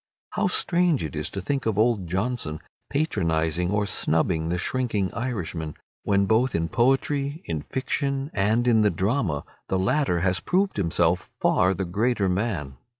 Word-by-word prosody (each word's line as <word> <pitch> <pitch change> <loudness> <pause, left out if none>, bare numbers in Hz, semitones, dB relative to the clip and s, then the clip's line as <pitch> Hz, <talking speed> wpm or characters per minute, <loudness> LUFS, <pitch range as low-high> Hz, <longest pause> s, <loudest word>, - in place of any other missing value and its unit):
How 210 - +1
strange 175 - +2
it 80 -1 -5
is 75 0 -3
to 100 - -5
think 135 +5 -2
of 110 -3 0
old 110 -5 +2
Johnson 95 -4 -2 0.3
patronizing 85 - 0
or 105 +1 +1
snubbing 80 -2 +1
the 90 - 0
shrinking 105 -2 -1
Irishman, 90 - -3 0.3
when 100 -1 +2
both 115 +5 +2
in 80 0 0
poetry, 140 +4 +1
in 80 -3 -3
fiction, 140 - -2
and 110 +5 +2
in 115 -2 +5
the 105 - +4
drama 95 - 0 0.3
the 95 - +1
latter 125 - +1
has 90 0 +2
proved 190 +2 0
himself 85 -1 +1
far 95 +1 +3
the 95 +1 -2
greater 105 +3 +1
man. 90 - -2
100 Hz, 155 wpm, -25 LUFS, 85-125 Hz, 0.3 s, in